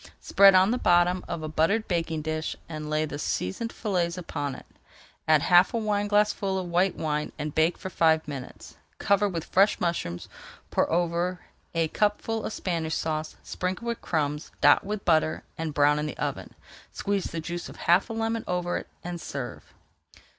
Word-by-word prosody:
Spread 195 -1 +6
on 190 +3 +5
the 250 - 0
bottom 175 +1 +3
of 170 -2 -4
a - - -3
buttered 165 +9 +1
baking 165 -3 -1
dish 155 0 -3
and 155 -2 -6
lay 155 0 +1
the 145 -1 -6
seasoned 150 - -2
fillets 180 -5 -1
upon 145 -6 -4
it. - - -12 0.6
Add 155 -2 +5
half 180 +5 +5
a - - +2
wineglassful 205 -2 +1
of 185 - -2
white 175 +2 +2
wine 150 -1 -2
and 150 -1 -4
bake 160 +2 +2
for 190 - -7
five 160 -2 +3
minutes. 140 -4 -8 0.2
Cover 200 0 +2
with 165 -4 -4
fresh 195 +3 +3
mushrooms, 130 - -2 0.4
pour - - +1
over 175 +1 0 0.3
a 165 -1 +2
cupful 215 +3 0
of - - -3
Spanish 165 -6 -2
Sauce, 155 -1 -3
sprinkle 185 +6 -3
with 235 - -3
crumbs, 150 -2 -2
dot 145 0 +6
with 205 0 -4
butter, 155 -2 +2
and 160 -1 -3
brown 145 +1 +3
in 150 - -2
the - - -6
oven. - - -4 0.4
Squeeze 200 -2 -1
the 165 - -4
juice 170 +2 -5
of - - -11
half 175 +6 +2
a - - -4
lemon 225 0 -1
over 180 -1 -1
it - - -7 0.2
and 175 -1 -5
serve. 135 -3 -6
170 Hz, 180 wpm, -27 LUFS, 155-195 Hz, 0.6 s, Spread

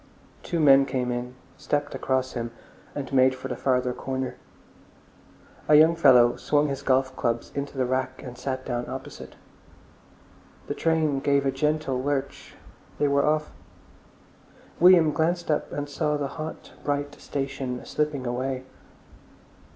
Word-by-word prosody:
Two 170 - -3
men 135 -3 +6
came 130 -2 -1
in, 125 +1 -4 0.2
stepped 145 0 -2
across 130 -1 -1
him, 120 -1 -3 0.5
and 140 -2 -5
made 130 0 +4
for 130 +1 -7
the 125 - -3
farther 125 -1 0
corner. 130 0 -4 1.3
A 150 - +6
young 160 +2 +6
fellow 125 -7 +5
swung 150 0 +1
his 135 0 -4
golf 130 -1 +1
clubs 115 0 -2
into 140 0 -5
the 130 - +1
rack 130 +1 -2
and 125 -2 -8
sat 130 +1 -4
down 120 -1 -3
opposite. - - -8 1.3
The - - -3
train 160 -4 +1
gave 140 0 +2
a 135 - +2
gentle 145 -1 -1
lurch, 140 0 -3 0.4
they 145 - +2
were 140 0 +2
off. 155 0 0 1.3
William 175 -3 +7
glanced 170 +2 0
up 150 - -1
and 145 0 -4
saw 150 +1 -1
the 140 -1 -3
hot, 155 +1 -7
bright 145 0 -2
station 135 -2 -4
slipping 150 -3 -2
away. 130 +2 -2
135 Hz, 145 wpm, -26 LUFS, 130-150 Hz, 1.3 s, William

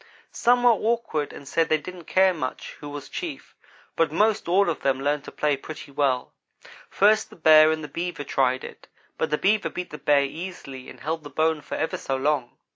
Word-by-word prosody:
"Some 245 +1 +3
were 245 - +7
awkward 225 -10 -1
and 140 - -11
said 165 +3 +1
they 155 - +4
didn't 175 +2 -10
care 190 +2 +4
much 140 -7 -5
who 145 - -8
was 145 -1 -7
chief, 330 -6 -6 0.4
but 165 -2 +2
most 210 +5 +1
all 195 +3 +4
of 170 - -1
them 135 -1 0
learned 145 +1 0
to - - -8
play 150 -1 +1
pretty 150 +1 -9
well. 135 -3 0 0.6
First 215 +2 +3
the - - -14
Bear 155 -1 +7
and 160 0 -2
the - - -5
Beaver 170 +1 -4
tried 130 -2 +1
it, - - -10 0.3
but - - 0
the 150 - +1
Beaver 210 +4 +2
beat 180 - -6
the 150 - -8
Bear 145 0 +3
easily 140 -3 -7
and - - -13
held 160 +1 -3
the 145 - -8
bone 160 0 +1
for 150 - -6
ever 160 - -2
so 135 - -3
long. 135 -2 -1
155 Hz, 210 wpm, -25 LUFS, 145-185 Hz, 0.6 s, were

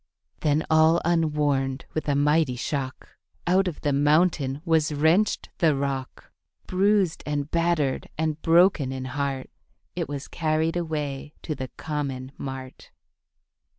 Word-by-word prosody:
Then 150 +1 +1
all 160 +1 +5
unwarned, 150 -5 +1
with 155 -1 -2
a 140 - +2
mighty 145 -1 +2
shock 130 +1 -4 0.4
Out 185 +2 +3
of 170 - -4
the 145 - +1
mountain 145 -1 +2
was 160 -2 +2
wrenched 160 +8 +2
the 160 -5 +4
rock; 135 -1 -4 0.3
Bruised 195 -2 +2
and 145 0 -2
battered, 165 -5 0
and 155 0 -1
broken 165 -5 +4
in 130 -1 -5
heart 135 - -3 0.4
It - - -3
was 140 -1 -5
carried 160 0 0
away 150 -4 -3
to 155 - -2
the 130 -2 -5
common 140 -4 -4
mart. 130 -1 -8
150 Hz, 130 wpm, -25 LUFS, 135-165 Hz, 0.4 s, all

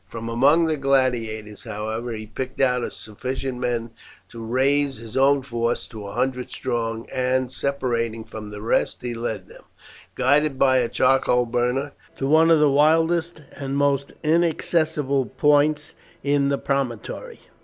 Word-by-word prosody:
From 115 +2 -6
among 140 +8 +4
the 160 -1 0
gladiators, 120 -6 0
however, 110 +3 -4
he 110 -1 -6
picked 130 +5 -6
out 125 -2 +1
sufficient 130 +4 -5
men 120 -2 -2 0.4
to 115 -1 -9
raise 135 +4 +1
his 115 -1 -10
own 135 +1 +4
force 120 -2 -1
to 105 -3 -8
a 100 - -8
hundred 125 +1 -1
strong, 115 -2 -3
and 130 0 0
separating 115 -5 -2
from 110 -1 -9
the 105 0 -8
rest 115 - 0
he 120 -1 -3
led 115 -2 -4
them, - - -15 0.5
guided 145 +2 +2
by 130 -1 +4
a 120 -2 +1
charcoal 130 -1 +3
burner, 125 +4 -1 0.3
to 135 - -2
one 160 +3 +5
of 165 -2 +6
the 150 - +5
wildest 160 +3 +2
and 135 0 -3
most 140 -1 +1
inaccessible 155 -4 +1
points 150 +4 +2 0.3
in 140 -1 +2
the 140 - +1
promontory. 135 -7 -3
130 Hz, 150 wpm, -23 LUFS, 115-140 Hz, 0.5 s, of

